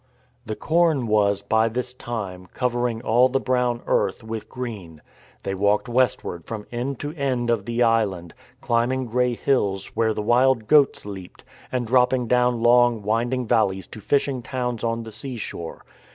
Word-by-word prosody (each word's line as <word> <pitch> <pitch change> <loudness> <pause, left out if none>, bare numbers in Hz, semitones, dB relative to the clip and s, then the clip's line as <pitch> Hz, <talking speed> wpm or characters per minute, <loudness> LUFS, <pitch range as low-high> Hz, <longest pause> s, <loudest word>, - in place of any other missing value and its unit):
The 110 - -3
corn 160 -4 +2
was, 100 -2 +2
by 110 +2 +2
this 125 +2 -3
time, 100 -8 -6
covering 120 -2 -1
all 125 +3 +4
the 135 +1 +1
brown 125 -2 0
earth - - 0
with 110 -1 -6
green. 105 -11 -7 0.4
They 95 - -2
walked 100 +4 +1
westward 120 -9 0
from 110 -2 -6
end 125 +3 -3
to 145 +1 -4
end 130 -6 -1
of 110 -4 0
the 120 +2 +1
island, 100 -7 +1 0.3
climbing 120 +3 0
grey 125 +1 0
hills 100 -8 -1
where 110 -1 +1
the 105 - -2
wild 120 +1 +3
goats 145 -2 +4
leaped, 95 -3 -9 0.3
and 125 -1 -1
dropping 125 +1 +3
down 125 -1 +2
long, 120 -2 +4
winding 120 +4 0
valleys 100 -5 +1
to 110 - -10
fishing 140 +1 0
towns 125 -2 -3
on 115 0 -1
the 110 - -9
seashore. 110 -7 -7
120 Hz, 160 wpm, -23 LUFS, 110-125 Hz, 0.4 s, all